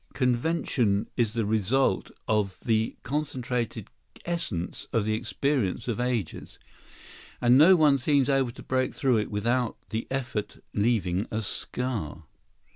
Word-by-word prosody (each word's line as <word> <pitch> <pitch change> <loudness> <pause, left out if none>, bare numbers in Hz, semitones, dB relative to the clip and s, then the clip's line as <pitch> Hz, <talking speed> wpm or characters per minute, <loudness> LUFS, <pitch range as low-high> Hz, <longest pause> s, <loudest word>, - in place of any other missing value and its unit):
] - - -30
And 125 -2 +3
yet—convention 120 -7 0
is 115 -3 +1
the 115 -2 0
result 110 +5 +1 0.2
of 100 -4 0
the 110 -1 +1
concentrated 130 -5 -3 0.4
essence 115 - -3
of 115 -3 +1
the 110 - +1
experience 125 -2 -1
of 120 -1 -2
ages; 120 -9 -3 0.8
and 120 0 +5
no 165 +7 +8
one 150 -4 +4
seems 140 0 +2
able 135 -3 +2
to 120 - -10
break 130 0 0
through 130 -4 +2
it 105 - -1
without 120 +3 0
the 110 +1 -3
effort 130 -5 -3 0.2
leaving 100 -3 +1
a 110 0 -2
scar. 105 - -3
120 Hz, 140 wpm, -27 LUFS, 105-135 Hz, 0.8 s, no